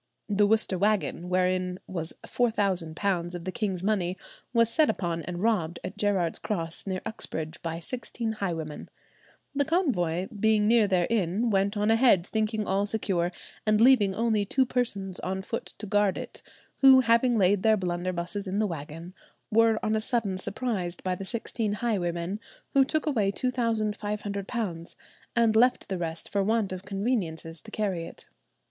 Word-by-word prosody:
"The 205 0 +3
Worcester 215 -4 +2
wagon, 190 -4 0
wherein 185 0 +1
was 170 -3 -3
£4,000 190 -5 0
of 175 -1 -7
the 185 - -2
king's 190 -2 -2
money, 190 -3 0 0.3
was 230 -2 +4
set 305 +7 +4
upon 170 -2 -1
and 175 +2 -5
robbed 175 -7 +1
at - - -5
Gerard's 190 -5 0
Cross, 165 -3 -3
near 185 -1 -2
Uxbridge, 160 -8 -4
by 165 0 -4
sixteen 230 +3 -3
highwaymen. 165 -8 -4 0.6
The 285 0 +2
convoy, 190 - 0
being 215 -1 +2
near 225 -2 +5
their 185 -3 +2
inn, 215 +2 +1
went 200 +1 +1
on 210 +2 +2
ahead, 225 -6 +5
thinking 215 0 -1
all 200 +2 0
secure, 185 -5 0 0.3
and 215 -1 +3
leaving 225 -6 +5
only 225 -2 +1
two 260 +6 +2
persons 200 -7 -2
on 190 +1 -3
foot 230 +4 -5
to - - -7
guard 205 -1 +2
it, - - -7 0.4
who, 265 -1 +8
having 235 0 +3
laid 195 0 +3
their 220 +1 +4
blunderbusses 180 +1 -2
in 190 +2 -2
the 215 - +2
wagon, 165 0 -6 0.4
were 225 0 +4
on 215 0 +1
a 215 - 0
sudden 215 -5 0
surprised 190 -5 -2
by 185 - 0
the 190 +2 -5
sixteen 220 0 -2
highwaymen, 190 -4 -2 0.3
who 275 - +6
took 310 +3 -1
away 220 -10 +1
£2,500, 210 -5 -2 0.4
and 230 -2 +3
left 250 +3 +3
the 190 - -1
rest 165 -1 -4
for 200 - 0
want 215 0 +1
of 185 -1 -5
conveniences 190 -6 -2
to - - -12
carry 190 -6 -2
it." - - -13
200 Hz, 160 wpm, -27 LUFS, 180-225 Hz, 0.6 s, who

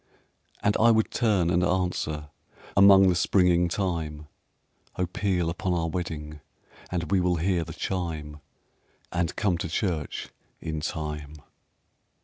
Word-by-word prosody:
And 105 - +3
I 115 - +6
would 110 -1 +3
turn 100 -8 +2
and 90 0 +2
answer 90 -5 -1 0.5
Among 100 -1 +8
the 90 - +4
springing 90 -1 +3
thyme, 80 -5 -2 0.7
"Oh, 90 - 0
peal 90 -1 -1
upon 90 +2 -1
our 80 -1 0
wedding, 75 -3 -5 0.5
And 90 0 -3
we 95 - +4
will 90 0 +2
hear 85 +1 +1
the 80 0 -8
chime, 80 -4 -4 0.7
And 85 -1 -1
come 95 -6 0
to 80 - -3
church 85 -4 -2 0.3
in 80 -1 -4
time." 75 -1 -4
85 Hz, 130 wpm, -26 LUFS, 80-95 Hz, 0.7 s, Among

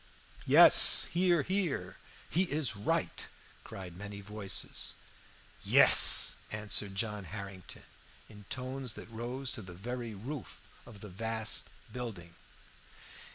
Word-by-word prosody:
"Yes. - - +7
Hear, 175 -3 +1
hear! 175 - -4 0.3
He 180 +4 -1
is 145 -8 -3
right!" 105 - -4 0.4
cried 90 -3 -11
many 100 +2 -10
voices. 100 -1 -3 0.7
"Yes," - - +7
answered 105 -1 -3
John 105 -1 -4
Harrington, 100 -1 -11 0.4
in 105 -1 -16
tones 130 +1 -6
that - - -12
rose 125 +4 -6
to 120 - -7
the 90 -3 -13
very 120 +3 -8
roof 130 +8 -10 0.3
of 105 -4 -15
the 105 - -11
vast 110 +3 -3 0.2
building. 100 -9 -9
110 Hz, 110 wpm, -30 LUFS, 100-125 Hz, 0.7 s, Yes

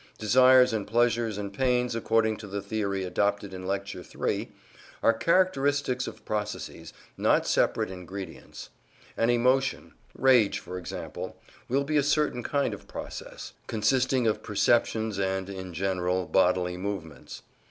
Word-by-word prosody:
Desires 125 +2 +5
and 105 -3 -2
pleasures 115 -1 +1
and 100 -1 -5
pains, 125 +1 +1
according 115 -1 +1
to 105 - -9
the 100 +1 -4
theory 100 -1 -2
adopted 100 +2 -1
in 95 0 -6
Lecture 100 +1 -3
III, - - -3 0.5
are 115 - +5
characteristics 145 -5 +1
of - - -9
processes, 105 -1 -4 0.3
not - - +3
separate - - +1
ingredients. 95 +1 -8 0.5
An 115 - +1
emotion 130 +3 +1 0.2
rage, 125 -6 +4
for 90 +1 -7
example 90 - -7 0.3
will 135 +3 +2
be 150 +2 0
a - - +5
certain 150 -3 +1
kind 140 +3 0
of - - -10
process, - - -8
consisting 130 +3 +1
of 110 - +1
perceptions 110 0 +1
and 95 -1 -1
(in 95 -2 -7
general) 90 +1 -1
bodily 90 -1 +2
movements. 90 -5 -6
110 Hz, 135 wpm, -27 LUFS, 95-125 Hz, 0.5 s, Desires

